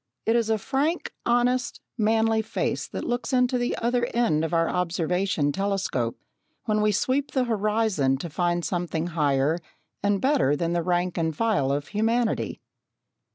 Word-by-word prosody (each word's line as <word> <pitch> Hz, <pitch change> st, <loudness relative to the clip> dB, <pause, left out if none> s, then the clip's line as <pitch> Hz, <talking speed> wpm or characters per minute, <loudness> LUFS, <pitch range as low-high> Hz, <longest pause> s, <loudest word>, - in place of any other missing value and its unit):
It 225 Hz, -, +3 dB
is 230 Hz, -2 st, +1 dB
a 220 Hz, -, +3 dB
frank, 285 Hz, -, -1 dB
honest, 245 Hz, +1 st, +1 dB, 0.2 s
manly 220 Hz, 0 st, +2 dB
face 220 Hz, +1 st, -2 dB
that -, -, -5 dB
looks 245 Hz, +3 st, -2 dB
into 250 Hz, 0 st, +3 dB
the 245 Hz, -, -1 dB
other 240 Hz, +1 st, +1 dB
end 225 Hz, -11 st, +2 dB
of 160 Hz, -, -2 dB
our 165 Hz, -1 st, +2 dB
observation 180 Hz, -2 st, 0 dB
telescope 190 Hz, -10 st, -1 dB, 0.5 s
when 215 Hz, -1 st, +1 dB
we 210 Hz, 0 st, +3 dB
sweep 260 Hz, +7 st, 0 dB
the 260 Hz, -, +2 dB
horizon 210 Hz, -, +1 dB
to 155 Hz, -, -5 dB
find 175 Hz, +1 st, 0 dB
something 175 Hz, -2 st, -2 dB
higher 145 Hz, 0 st, +2 dB, 0.4 s
and 200 Hz, -1 st, +1 dB
better 260 Hz, -, +2 dB
than 170 Hz, +2 st, -1 dB
the 175 Hz, -, +1 dB
rank 175 Hz, 0 st, 0 dB
and 160 Hz, -1 st, 0 dB
file 210 Hz, -13 st, +1 dB
of 145 Hz, +1 st, -2 dB
humanity. 225 Hz, +3 st, 0 dB
205 Hz, 155 wpm, -25 LUFS, 165-235 Hz, 0.5 s, It